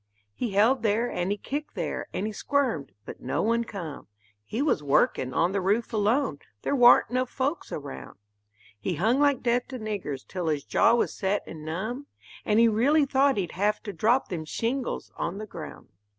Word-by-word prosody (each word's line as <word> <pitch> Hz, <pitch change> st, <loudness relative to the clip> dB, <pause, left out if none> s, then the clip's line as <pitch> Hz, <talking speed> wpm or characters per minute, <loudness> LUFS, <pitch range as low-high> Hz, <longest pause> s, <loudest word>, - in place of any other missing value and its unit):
He 225 Hz, -, -3 dB
held 225 Hz, +6 st, +4 dB
there 225 Hz, +2 st, +1 dB
and 180 Hz, +1 st, -1 dB
he 205 Hz, -, 0 dB
kicked 290 Hz, +8 st, -5 dB
there -, -, -3 dB
and 200 Hz, -, -2 dB
he 215 Hz, -, -3 dB
squirmed, 235 Hz, -, -1 dB
but -, -, -9 dB
no 130 Hz, -, -1 dB
one 230 Hz, +2 st, +2 dB
come; 175 Hz, -10 st, -7 dB, 0.4 s
He 215 Hz, -, -5 dB
was 280 Hz, -, +2 dB
workin' 135 Hz, -2 st, +2 dB
on 170 Hz, +7 st, +2 dB
the 200 Hz, 0 st, 0 dB
roof 210 Hz, +6 st, 0 dB
alone 220 Hz, -, +1 dB, 0.2 s
there -, -, 0 dB
war'n't 245 Hz, -2 st, +6 dB
no 255 Hz, +1 st, +1 dB
folks 280 Hz, +6 st, -3 dB
around 65 Hz, -, -7 dB, 0.6 s
He 180 Hz, -, -2 dB
hung 220 Hz, -, +2 dB
like 285 Hz, -2 st, +3 dB
death 245 Hz, 0 st, +1 dB
to 260 Hz, -, -6 dB
niggers 200 Hz, -, -4 dB
till 180 Hz, -3 st, -4 dB
his 150 Hz, -3 st, 0 dB
jaw 230 Hz, -, +4 dB
was 240 Hz, -, 0 dB
set 195 Hz, +1 st, -1 dB
and 155 Hz, -2 st, -9 dB
numb, 215 Hz, -, -4 dB, 0.4 s
And 215 Hz, +1 st, +3 dB
he 230 Hz, -, +7 dB
reely 275 Hz, +8 st, +3 dB
thought 275 Hz, -1 st, +3 dB
he'd 180 Hz, -4 st, -1 dB
have 205 Hz, +3 st, 0 dB
to 205 Hz, -, -5 dB
drop 235 Hz, +6 st, +2 dB
them 170 Hz, -4 st, -3 dB
shingles 240 Hz, -, -3 dB
on 170 Hz, +3 st, -3 dB
the 215 Hz, -, -5 dB
ground. 170 Hz, -6 st, -9 dB
215 Hz, 195 wpm, -27 LUFS, 180-250 Hz, 0.6 s, he